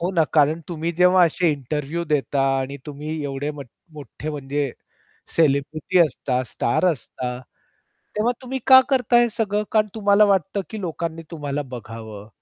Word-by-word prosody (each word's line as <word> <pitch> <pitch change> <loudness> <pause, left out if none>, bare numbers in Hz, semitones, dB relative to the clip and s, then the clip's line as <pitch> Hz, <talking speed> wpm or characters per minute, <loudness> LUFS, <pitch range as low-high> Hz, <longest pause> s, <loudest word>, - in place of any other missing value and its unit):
हो 175 +2 -1
ना. 165 -3 +3
कारण 155 +1 +3
तुम्ही 170 0 -3
जेव्हा 180 +1 +5
असे 175 +1 +1
इंटरव्ह्यू 150 +3 -3
देता 145 -3 0 0.2
आणि 135 +1 -4
तुम्ही 150 +1 -5
एवढे 140 +1 -3
मठ 140 -4 -9 0.2
मोठे 150 +1 -7
म्हणजे 145 -1 -2 0.7
सेलिब्रिटी 155 +3 +1
असता 130 -5 +1
स्टार 120 +11 0
असता 125 -1 -6 0.8
तेव्हा 225 +3 +2
तुम्ही 265 +1 -4
का 260 -1 +10
करता 250 -3 +3
हे 240 - +3
सगळं? 210 -1 -1
कारण 215 -1 +3
तुम्हाला 205 -1 +4
वाटतं, 195 0 +1
की 220 - -6
लोकांनी 165 -2 -4
तुम्हाला 145 -3 -3
बघावं 110 -3 -8
155 Hz, 150 wpm, -22 LUFS, 140-185 Hz, 0.8 s, का